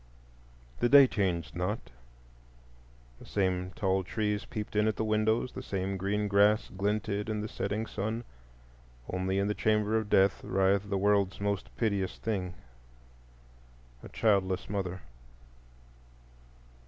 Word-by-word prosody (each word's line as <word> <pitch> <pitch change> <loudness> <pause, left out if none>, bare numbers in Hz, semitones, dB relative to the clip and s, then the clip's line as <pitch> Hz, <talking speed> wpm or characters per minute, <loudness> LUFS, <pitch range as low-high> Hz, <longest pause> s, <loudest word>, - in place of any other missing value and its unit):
The 120 - +2
day 140 0 +9
changed 90 -9 -1
not; 90 +5 -3 1.3
the - - -13
same 90 -2 0
tall 95 -2 +1
trees 105 +1 -2
peeped 105 0 -6
in 105 +1 +3
at 110 - +1
the - - -1
windows, 110 +3 +1
the - - -7
same 95 0 -3
green 100 +2 -1
grass 105 +1 +3
glinted 105 +1 -1
in 105 -1 -1
the 105 - -3
setting 105 +1 -3
sun. 110 +3 -3 0.8
Only 95 +1 -1
in 100 +1 +1
the 105 - 0
chamber 105 0 +1
of 110 -2 -6
death 95 -1 +3
writhed 95 +1 +1
the 100 - 0
world's 100 -1 +2
most 100 0 -2
piteous 100 -5 -1
thing—a - - -10
childless 95 -4 +1
mother. 95 -2 -3
100 Hz, 130 wpm, -30 LUFS, 90-105 Hz, 1.3 s, day